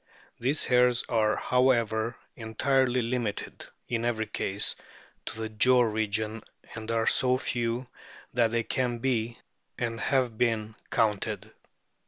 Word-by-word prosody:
These 135 +6 +1
hairs 125 -1 +4
are, 110 -3 +2
however, 120 -3 +1 0.2
entirely 125 +2 +1
limited, 115 -3 -3 0.2
in 115 -1 -1
every 115 -2 0
case, 100 -1 0 0.5
to 110 - -4
the 110 - -2
jaw 125 +4 +4
region, 110 0 -1 0.3
and 110 0 -7
are 115 -1 +1
so 125 0 +4
few 120 0 -2 0.5
that 115 -2 +3
they 115 0 0
can 120 0 -1
be, 115 -2 -1 0.4
and 115 -1 -2
have 125 -5 0
been, 110 -2 0 0.2
counted. 110 -1 0
115 Hz, 125 wpm, -28 LUFS, 110-125 Hz, 0.5 s, hairs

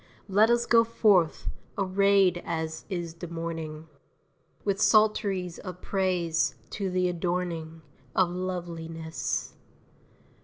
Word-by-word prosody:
Let 210 +3 +4
us 235 0 +3
go 230 -1 +6
forth, 205 -7 +2 0.3
arrayed 195 -2 +3
as 160 -1 -3
is 175 -4 -3
the 170 +1 -8
morning, 165 -2 -5 0.8
With 200 0 0
psalteries 200 -5 +3
of 180 -2 -8
praise, 180 -5 0 0.2
to 200 -3 -2
the 180 0 +1
adorning 170 -2 -3 0.3
Of 185 -2 +3
loveliness! 170 -3 -4
180 Hz, 105 wpm, -28 LUFS, 165-195 Hz, 0.8 s, go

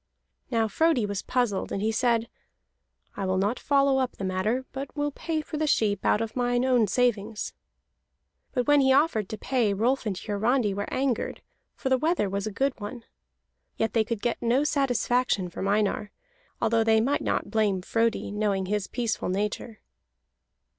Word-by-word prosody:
Now 225 -3 +1
Frodi 275 +1 +2
was 200 -1 -3
puzzled, 245 -6 -1
and - - -2
he 215 +2 +1
said: 235 0 +1 0.9
"I 195 - -3
will 185 0 +1
not 205 +6 0
follow 275 -1 +3
up 255 -1 -1
the - - -8
matter, 210 +8 -1
but 275 +2 -7
will 290 0 0
pay 315 +2 -3
for 305 0 -6
the 310 0 0
sheep 205 -8 +1
out 210 - +3
of 225 -1 -4
mine 245 0 +1
own 245 -4 +3
savings." 220 -2 0 1.0
But 250 -2 0
when 290 -1 +5
he 265 0 +4
offered 265 - +2
to 220 - -5
pay, 235 -6 0
Rolf 240 +4 +1
and 195 -3 -2
Hiarandi 215 +2 0
were 205 +1 -4
angered, 260 -3 -1 0.3
for 265 - -3
the 260 -1 +3
wether 320 - +1
was 200 +1 -2
a - - -3
good 270 +6 0
one. 230 +3 -6 0.7
Yet 225 - 0
they 225 - +3
could 220 -1 -4
get 240 -1 -1
no 245 +4 +2
satisfaction 250 -8 +1
from 190 - -4
Einar, 205 0 +1 0.5
although 225 0 +2
they 220 0 +4
might 265 +6 +1
not - - -1
blame 205 -4 +1
Frodi, 225 0 0
knowing 205 -2 0
his 205 0 -1
peaceful 235 -6 -2
nature. 210 +3 -3
230 Hz, 175 wpm, -27 LUFS, 205-260 Hz, 1.0 s, when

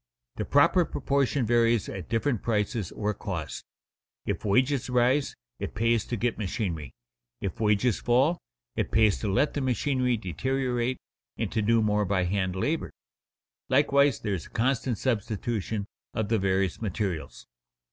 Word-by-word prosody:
The - - -2
proper 145 +6 +4
proportion 140 -3 0
varies 115 -1 +3
at 95 -4 -7
different 115 0 0
prices, 105 -3 -1
or 105 0 -2
costs. 80 - -5 0.6
If - - -2
wages 130 +6 +2
rise, 125 +3 +2 0.2
"it - - -5
pays" 115 0 +2
to 120 - -3
get 115 +2 -1
machinery; 85 - -3 0.4
if 100 +1 -4
wages 105 +1 +2
fall, 130 +8 +2 0.4
it - - -1
pays 110 -3 +3
to 105 - -1
let 145 +10 +2
the 145 - -2
machinery 130 -1 +1
deteriorate 125 - -1 0.4
and - - -2
to 110 - 0
do 115 +1 +3
more 105 0 +2
by 95 -1 +1
hand 95 0 -1
labor. 150 +12 -1 0.8
Likewise 140 -1 +4
there 105 - -1
is 90 - -4
constant 125 -1 0
substitution 110 -2 -2 0.3
of 110 -2 -1
the 115 -1 +2
various 95 -1 0
materials. 95 -7 -3
115 Hz, 145 wpm, -27 LUFS, 100-130 Hz, 0.8 s, proper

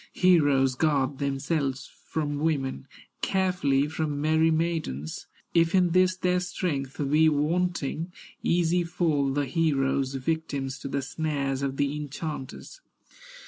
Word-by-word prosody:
Heroes 145 -8 +4
guard 140 -1 +1
themselves 140 -1 -1 0.2
from 145 -2 -2
women, 140 - -1 0.3
Carefully 180 -8 +1
from 150 -1 -2
merry 160 +2 +3
maidens; 160 - -2 0.3
If 165 +1 +3
in 180 -2 +4
this 185 +1 +4
their 180 -1 +1
strength 155 -7 -3
be 160 +1 +5
wanting, 165 +1 -1 0.3
Easy 175 +1 +2
fall 160 -5 0
the 145 +1 0
heroes, 135 -2 +1
victims 140 -1 -2
To - - -6
the 140 0 -2
snares 140 -1 -2
of 135 -1 -2
the 140 0 0
enchanters. 150 - -6
150 Hz, 120 wpm, -27 LUFS, 135-165 Hz, 0.3 s, be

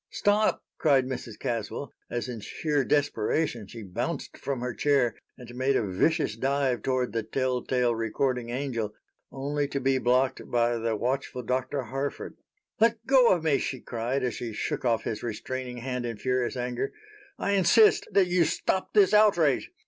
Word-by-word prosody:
"Stop!" 210 +1 +1 0.2
cried 140 -5 +4
Mrs. 125 -4 -6
Caswell, 115 +3 -4 0.2
as 120 +1 -3
in 120 -3 -5
sheer 145 +6 -1
desperation 140 -3 0
she 115 +2 -9
bounced 90 -3 -4
from 135 -3 -4
her 125 -1 -2
chair 135 -3 +2 0.2
and 120 -1 -11
made 130 +2 +1
a 115 - +1
vicious 105 - +1
dive 135 0 0
toward 130 -4 -1
the 115 - 0
tell 130 +2 -1
tale 125 -2 +1
recording 120 +2 -1
angel, 120 -5 -3 0.4
only 145 +2 -2
to 140 - -3
be 135 0 +2
blocked 130 +2 +1
by 120 0 +2
the 115 -1 -1
watchful 125 +2 -2
Dr. 130 +3 -1
Harford. 135 +4 -4 0.4
"Let 230 0 +2
go 265 -3 +6
of 175 -3 +2
me," 145 -4 +3
she 130 - -3
cried, 120 +4 -2
as 125 - 0
she 115 -2 -5
shook - - -3
off 115 -3 +1
his 105 - -3
restraining 125 +2 -5
hand 125 0 -3
in 115 -2 -5
furious 125 +3 -1
anger. 125 0 -2 0.5
"I 200 - -1
insist 200 +3 +5
that 195 -2 +4
you 180 -1 +3
stop 190 +5 -1
this 205 -1 +5
outrage. 175 -10 +4
130 Hz, 170 wpm, -27 LUFS, 120-145 Hz, 0.5 s, go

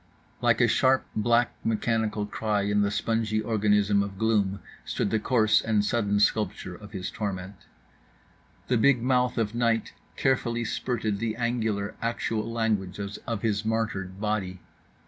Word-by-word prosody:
Like - - +3
a - - +5
sharp 130 0 +3
black 120 +2 +2
mechanical 110 -1 0
cry 105 0 -1
in 105 +1 +2
the 100 - +2
spongy 110 +1 0
organism 105 -2 +2
of 100 -1 -4
gloom 100 -3 +1 0.2
stood - - -2
the 110 - +2
coarse 110 -2 +3
and 105 -2 +1
sudden 105 -2 +1
sculpture 105 -3 0
of 100 +3 -12
his 95 -3 -5
torment; 95 -2 -4 1.1
the 125 -2 +2
big 125 -1 +4
mouth 125 -1 +2
of 110 -1 0
night 115 -2 0 0.2
carefully 120 -3 0
spurted 110 -3 -2
the 115 -1 -2
angular 110 -4 -1
actual 115 -1 -2
language 105 -5 -1 0.3
of 115 -3 -3
his 105 -2 0
martyred 105 -4 -2
body. 105 -4 -2
110 Hz, 145 wpm, -27 LUFS, 100-115 Hz, 1.1 s, a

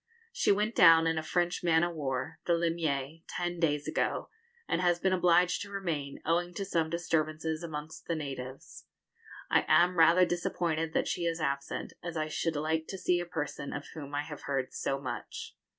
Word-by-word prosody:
She - - +2
went 210 +3 +1
down 165 -4 +7
in 165 -1 +1
a - - -2
French 175 +2 0
man 165 -1 +4
of 175 0 0
war, 135 -5 -3
the 175 - +4
'Limier,' 165 -3 -1
ten 175 -1 -3
days 150 -3 +1
ago, - - -1 0.4
and 175 - 0
has 175 -1 +3
been 190 +1 +1
obliged 180 0 +3
to 200 - -6
remain, 165 -8 -3
owing 175 +2 0
to 195 - -3
some 165 -4 0
disturbances 160 -1 -1
amongst 155 -2 -7
the 170 - 0
natives. 135 -3 -7 0.7
I - - +5
am 180 0 +4
rather 170 +3 +7
disappointed 165 -2 -1
that - - +1
she 175 - -1
is 165 0 -1
absent, 140 -2 -2
as 170 -1 -5
I 155 0 -1
should 160 +1 -1
like 160 +2 -1
to 190 - -5
see 180 -1 +1
a 175 - -4
person 150 -4 -4
of 145 - -6
whom 145 -2 -7
I 145 - 0
have 150 -1 -8
heard 135 -2 -1
so 135 0 -1
much. - - -6
165 Hz, 190 wpm, -30 LUFS, 150-175 Hz, 0.7 s, down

